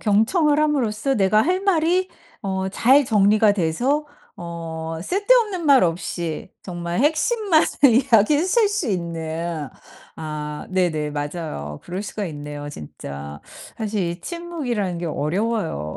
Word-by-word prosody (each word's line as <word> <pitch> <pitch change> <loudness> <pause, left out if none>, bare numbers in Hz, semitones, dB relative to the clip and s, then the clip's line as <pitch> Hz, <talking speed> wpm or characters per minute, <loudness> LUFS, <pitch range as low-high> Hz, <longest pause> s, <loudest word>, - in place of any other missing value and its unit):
경청을 290 - +3
함으로써 270 -4 +1
내가 215 +1 +3
할 365 +4 +1
말이 365 0 +2 0.3
어 190 -1 -2
잘 265 +8 +4
정리가 210 -1 +4
돼서 240 - 0 0.3
어 165 -1 -6
쓸데없는 405 - +2
말 275 -2 +6
없이 170 0 -3
정말 175 0 -3
핵심만을 320 - +2 0.4
이야기하실 315 - +4
수 405 - -1
있는 165 -4 -3 0.5
아 150 -1 -5
네네. 165 -5 0
맞아요. 145 - -5
그럴 180 +3 -5
수가 210 0 -4
있네요, 145 -1 -7
진짜. 70 - -8 0.4
사실 215 -2 -2
이 170 +1 -7
침묵이라는 265 - -3
게 175 - -4
어려워요. 160 - -2
200 Hz, 260 characters per minute, -22 LUFS, -, 0.5 s, 말